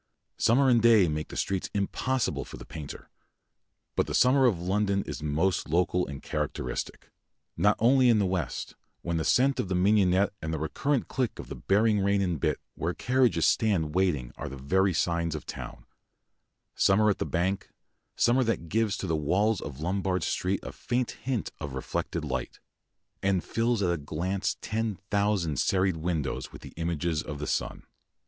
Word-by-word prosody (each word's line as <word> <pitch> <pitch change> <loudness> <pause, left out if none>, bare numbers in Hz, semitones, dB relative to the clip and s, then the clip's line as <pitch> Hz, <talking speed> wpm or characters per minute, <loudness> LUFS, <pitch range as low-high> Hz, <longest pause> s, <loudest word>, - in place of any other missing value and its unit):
Summer 135 +4 +4
and 120 -3 +5
day 110 -5 +6
make 75 0 -2
the - - -8
streets 95 -1 -1
impossible 125 +6 -1
for - - -10
the - - -10
painter. 75 -3 -9 0.8
But - - +1
the - - -2
summer 130 +1 +5
of 100 -8 +1
London 100 +2 0
is 75 0 -6
most 80 +4 0
local 90 +2 +1
and 70 -1 -8
characteristic - - -4 0.4
not - - +3
only 125 +2 +5
in 115 - +5
the 100 - +2
west, 90 -2 -3 0.3
when 85 -1 -1
the 80 - 0
scent 135 +7 +3
of 105 -7 -1
mignonette 95 +1 +3
and 80 - -3
the 80 - -1
recurrent 130 - -1
click 125 -4 -2
of - - -8
the - - -5
bearing 105 +1 +2
rein 100 +1 +2
and 90 -5 0
bit - - 0
where 85 +2 -3
carriages 130 -1 +2
stand 90 -9 +2
waiting 80 -10 0
are - - -5
the 70 - -8
very 95 +9 +2
signs 85 -1 0
of 75 - -6
town; - - -8 0.9
summer 105 +3 +3
at - - -3
the - - +1
Bank, 95 +3 -1 0.5
summer 125 +2 +3
that 110 -8 -2
gives 110 -1 +1
to - - -4
the 80 -3 0
walls 95 +8 +1
of 70 0 -7
Lombard 90 +1 -1
Street 95 +2 -1
a - - -6
faint 125 0 -2
hint 125 -4 -3
of 70 -4 -5
reflected 75 +4 -3
light, 65 -3 -4 0.6
and 95 -3 +1
fills 115 -2 0
at 90 - +2
a - - -1
glance 85 +6 -2
ten 110 -1 -2 0.2
thousand 100 -8 +1
serried 95 -2 +2
windows 80 -5 -2
with - - -12
the - - -10
images 85 -1 -1
of 75 - -6
the 75 - -4
sun. - - -2
95 Hz, 180 wpm, -28 LUFS, 80-110 Hz, 0.9 s, day